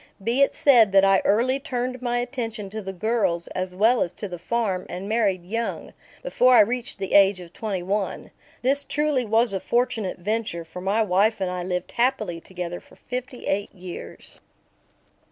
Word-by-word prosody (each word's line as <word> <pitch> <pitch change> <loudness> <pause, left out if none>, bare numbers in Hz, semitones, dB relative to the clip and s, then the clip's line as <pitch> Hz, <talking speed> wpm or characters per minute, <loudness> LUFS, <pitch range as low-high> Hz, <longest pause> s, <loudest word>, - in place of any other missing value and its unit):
Be 235 +5 +1
it 275 - +5
said 235 -8 +5
that 195 0 +6
I 195 -1 +4
early 250 +6 +2
turned 255 -1 -3
my 245 -1 -1
attention 230 -5 -4
to 220 +1 -5
the 190 -1 -5
girls 190 -3 0
as 185 0 -4
well 225 +5 +3
as 175 - -1
to 205 - -5
the 175 -2 -7
farm 195 -2 -1
and 185 +3 -6
married 205 -5 0
young, 230 +5 -4 0.3
before 255 - +4
I 225 - +9
reached 245 +3 -1
the 195 -1 -4
age 200 -1 +6
of 175 -1 -12
twenty 200 -5 -3
one. 200 +2 -3 0.3
This 275 +3 +2
truly 295 -4 0
was 225 0 +3
a 190 - -1
fortunate 235 -3 -1
venture, 205 -3 -3
for 170 +3 -9
my 200 +4 +1
wife 205 +3 +2
and 185 -2 -1
I 180 0 -3
lived 180 0 -3
happily 225 -9 0
together 175 -1 -6
for - - -20
fifty 250 0 -6
eight 200 +1 -1
years. 180 -1 -9
210 Hz, 185 wpm, -24 LUFS, 185-240 Hz, 0.3 s, I